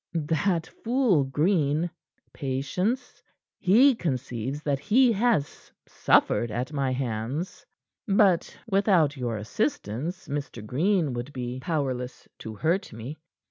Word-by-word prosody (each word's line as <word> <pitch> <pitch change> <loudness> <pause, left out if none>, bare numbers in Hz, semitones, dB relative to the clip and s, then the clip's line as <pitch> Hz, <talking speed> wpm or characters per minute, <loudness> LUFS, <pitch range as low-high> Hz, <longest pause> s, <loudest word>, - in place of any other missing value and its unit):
That 165 +2 0
fool 230 - +1
Green 155 +2 +1 0.4
patience 170 - -2 0.4
he 240 +10 +6
conceives 135 - -3
that 140 -2 0
he 240 - +4
has 215 -8 0 0.2
suffered 120 - +2
at 125 +7 -3
my 135 -2 0
hands. 130 +6 -3 0.4
But 195 -4 +3
without 190 -8 +3
your 120 -4 -2
assistance 150 - -3
Mr. 140 -6 -5
Green 160 - +1
would 120 +4 -5
be 125 0 -4
powerless 130 -6 -3
to 110 -1 -7
hurt 170 - 0
me. 120 +7 -8
150 Hz, 110 wpm, -26 LUFS, 130-190 Hz, 0.4 s, he